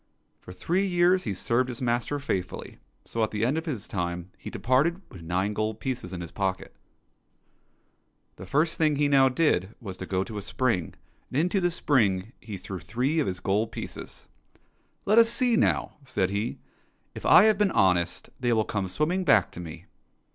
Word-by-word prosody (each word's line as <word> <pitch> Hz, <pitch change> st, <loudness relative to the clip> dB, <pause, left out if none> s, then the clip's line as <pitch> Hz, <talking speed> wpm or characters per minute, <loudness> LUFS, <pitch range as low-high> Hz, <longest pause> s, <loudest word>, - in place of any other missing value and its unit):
For -, -, -12 dB
three 175 Hz, -, 0 dB
years 180 Hz, +1 st, +3 dB
he 105 Hz, -, -1 dB
served 120 Hz, +6 st, 0 dB
his 120 Hz, -, -5 dB
master 120 Hz, +3 st, 0 dB
faithfully, 95 Hz, -, -4 dB, 0.3 s
so, 115 Hz, -, -2 dB
at 110 Hz, -, +1 dB
the 105 Hz, +1 st, -1 dB
end 130 Hz, +5 st, +1 dB
of 160 Hz, +1 st, -3 dB
his 125 Hz, -11 st, -4 dB
time, 90 Hz, -1 st, -3 dB
he -, -, -9 dB
departed 140 Hz, +8 st, +1 dB
with 90 Hz, -, -11 dB
nine 90 Hz, +5 st, -1 dB
gold 110 Hz, +1 st, -2 dB
pieces 125 Hz, -8 st, -4 dB
in 90 Hz, -2 st, -5 dB
his 85 Hz, -2 st, -7 dB
pocket. 95 Hz, +1 st, -3 dB, 1.6 s
The -, -, -9 dB
first 155 Hz, +3 st, +1 dB
thing 155 Hz, -2 st, +3 dB
he 145 Hz, +1 st, +2 dB
now 135 Hz, -2 st, +5 dB
did 125 Hz, -, +1 dB
was 95 Hz, -5 st, -7 dB
to 90 Hz, -, -7 dB
go 95 Hz, 0 st, 0 dB
to 105 Hz, 0 st, -6 dB
a -, -, -6 dB
spring, 100 Hz, -5 st, -1 dB, 0.3 s
and 135 Hz, -, 0 dB
into 180 Hz, +4 st, +1 dB
this 175 Hz, -1 st, +1 dB
spring 110 Hz, -, +1 dB
he 105 Hz, -3 st, -7 dB
threw 95 Hz, 0 st, -7 dB
three 125 Hz, -, -1 dB
of 150 Hz, -, +1 dB
his 90 Hz, -1 st, -3 dB
gold 105 Hz, +4 st, 0 dB
pieces. -, -, -8 dB, 0.4 s
'' -, -, -42 dB
Let 215 Hz, +3 st, +5 dB
us 230 Hz, 0 st, +6 dB
see 245 Hz, 0 st, +2 dB
now," -, -, +1 dB
said 100 Hz, -8 st, -1 dB
he, 105 Hz, +3 st, -2 dB, 0.3 s
" -, -, -42 dB
if -, -, -9 dB
I -, -, +8 dB
have 215 Hz, -2 st, +4 dB
been 205 Hz, -1 st, +4 dB
honest, 90 Hz, -, +1 dB
they 120 Hz, -1 st, +1 dB
will 110 Hz, -1 st, +2 dB
come 100 Hz, -3 st, -2 dB
swimming 155 Hz, -, 0 dB
back 105 Hz, -, +4 dB
to -, -, -10 dB
me." 85 Hz, -2 st, -8 dB
115 Hz, 200 wpm, -27 LUFS, 95-150 Hz, 1.6 s, I